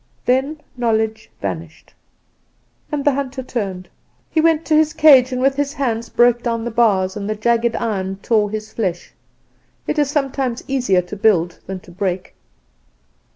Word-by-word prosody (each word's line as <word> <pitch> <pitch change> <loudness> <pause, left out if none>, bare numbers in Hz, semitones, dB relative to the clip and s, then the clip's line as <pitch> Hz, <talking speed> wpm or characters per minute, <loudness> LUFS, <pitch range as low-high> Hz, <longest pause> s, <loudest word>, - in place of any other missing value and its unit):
"Then 270 +5 +1 0.2
Knowledge 220 - 0
vanished. 160 -1 -6 1.0
"And 290 -2 -2
the 290 - +5
hunter 265 -1 -3
turned. 195 -7 -4 0.4
He 315 - +2
went 325 0 +2
to 310 - +2
his 310 0 +3
cage, 275 -6 +6
and 255 - -2
with 270 +1 +2
his 285 0 -1
hands 235 -5 -2
broke 240 0 +3
down 230 -1 -2
the 240 - -3
bars, 200 -5 +2
and 205 0 -4
the 215 - -1
jagged 235 +1 +1
iron 195 -4 -2
tore 215 -3 +2
his 215 +1 -6
flesh. 185 -6 -3 0.7
It 305 - -1
is 290 -2 +2
sometimes 270 -4 -1
easier 245 -9 +1
to 180 +4 -8
build 180 -5 +2
than 190 -1 -5
to 175 - -15
break. 185 0 -3
235 Hz, 160 wpm, -19 LUFS, 200-270 Hz, 1.0 s, cage